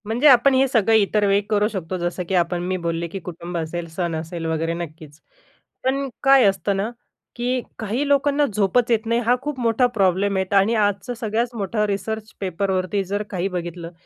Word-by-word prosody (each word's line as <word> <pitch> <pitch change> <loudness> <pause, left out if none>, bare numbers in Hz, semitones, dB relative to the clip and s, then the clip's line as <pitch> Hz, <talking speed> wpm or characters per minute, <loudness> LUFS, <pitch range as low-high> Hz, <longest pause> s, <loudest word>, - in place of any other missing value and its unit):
म्हणजे 235 +7 +2
आपण 265 0 +6
हे 265 +1 +4
सगळं 225 -3 +3
इतर 210 0 +3
वेळी 200 +1 +3
करू 210 -1 +2
शकतो 185 -4 -4
जसं 175 +1 -3
की 190 - +1
आपण 175 0 +1
मी 185 0 -1
बोलले, 170 -1 -2
की 195 +4 -6
कुटुंब 175 0 -7
असेल, 170 +1 -4
सण 170 0 -3
असेल 165 +1 -5
वगैरे 160 +1 -1
नक्कीच. 155 -3 -8 0.6
पण 275 +1 0 0.2
काय 270 -1 +6
असतं 195 0 +1
ना, 200 +3 -1 0.5
की 250 +1 -1 0.2
काही 230 +6 -2
लोकांना 285 +1 +3
झोपच 215 +4 +2
येत 225 -1 +2
नाही 230 +1 +1
हा 245 +2 +4
खूप 295 -1 -4
मोठा 235 +1 +2
प्रॉब्लेम 195 +1 +2
आहेत 190 +1 -2
आणि 200 +4 +4
आजचं 205 +3 0
सगळ्यात 230 +1 -1
मोठा 210 +1 -1
रिसर्च 215 +2 -3
पेपरवरती 190 +1 -1
जर 200 +2 -3
काही 185 -1 -2
बघितलं 175 -2 -5
200 Hz, 190 wpm, -22 LUFS, 175-230 Hz, 0.6 s, आपण